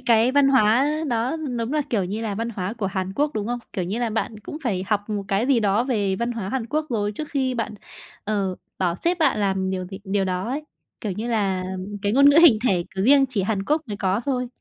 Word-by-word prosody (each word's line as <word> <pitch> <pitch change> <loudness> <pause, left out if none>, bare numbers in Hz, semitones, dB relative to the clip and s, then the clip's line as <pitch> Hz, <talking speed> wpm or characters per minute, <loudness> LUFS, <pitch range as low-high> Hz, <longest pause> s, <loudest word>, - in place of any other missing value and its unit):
cái 235 0 +3
văn 280 0 +5
hóa 255 0 +4 0.2
đó 240 +4 0 0.2
đúng 230 +3 -2
là, 305 -1 +1
kiểu 210 -5 +1
như 200 +5 -3
là, 215 -3 -2
văn 230 +3 -2
hóa 195 -2 -3
của 225 -4 -3
Hàn 190 -1 -3
Quốc, 290 +8 +1
đúng 210 -1 -2
không? 245 +1 -2
Kiểu 185 - -2
như 195 +6 -3
là, 240 -2 -1
bạn 220 0 -2
cũng 295 +8 -7
phải 190 -6 -1
học 205 0 -1
một 205 -2 -2
cái 200 +5 +1
gì 265 -4 +3
đó 210 +2 +2
về 205 -7 0
văn 235 +3 -1
hóa 220 -5 -4
Hàn 250 0 -2
Quốc 305 +5 -1
rồi 205 -3 0
trước 300 +8 -6
khi 260 -3 0
bạn, 230 -2 -3 0.5
ờ, 200 -3 -1 0.2
bảo 175 -2 0
sếp 345 - 0
bạn 315 - +3
làm 190 -1 0
điều 185 -1 -2
gì 190 +1 -8
điều 195 0 0
đó 185 +2 -2
ấy, 285 +4 -3 0.4
kiểu 210 - -3
như 220 +6 -4
là, 195 -5 0 0.4
cái 205 - +1
ngôn 280 +4 +7
ngữ 285 - +4
hình 270 -11 +7
thể, 180 -3 +1
kiểu, 190 0 -1
riêng 275 +3 +6
chỉ 225 -6 -1
Hàn 195 0 -1
Quốc 300 +7 +1
mới 205 - -4
có 195 +1 0
thôi. 250 -2 -1
215 Hz, 255 wpm, -23 LUFS, 195-250 Hz, 0.5 s, ngôn